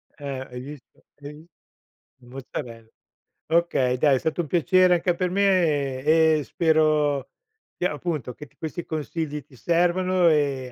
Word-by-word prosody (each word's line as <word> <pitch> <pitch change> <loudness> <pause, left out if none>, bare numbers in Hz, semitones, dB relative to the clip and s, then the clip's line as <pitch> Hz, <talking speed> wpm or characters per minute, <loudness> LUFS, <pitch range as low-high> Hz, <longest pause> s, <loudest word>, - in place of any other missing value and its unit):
Eh, 140 -3 -6
hai 125 - -7
visto, 145 0 -13 0.2
hai 145 +1 -8
vis 155 +3 -15 0.7
mozzarel 120 -2 -8 0.6
Okay 160 -7 +1
dai, 140 +1 +3
è - - 0
stato 160 +4 -1
un 165 - -6
piacere 180 +3 +3
anche 175 +1 0
per 180 0 -1
me 165 -9 +1
e 160 0 +4
e - - -4
spero 155 -4 +1 0.5
di - - -2
appunto 150 -6 -3
che 150 - -11
t - - -33
questi 165 +1 -6
consigli 155 -2 -4
ti 130 - -20
servano 175 +3 +2
e 140 -4 0
155 Hz, 150 wpm, -24 LUFS, 135-170 Hz, 0.7 s, e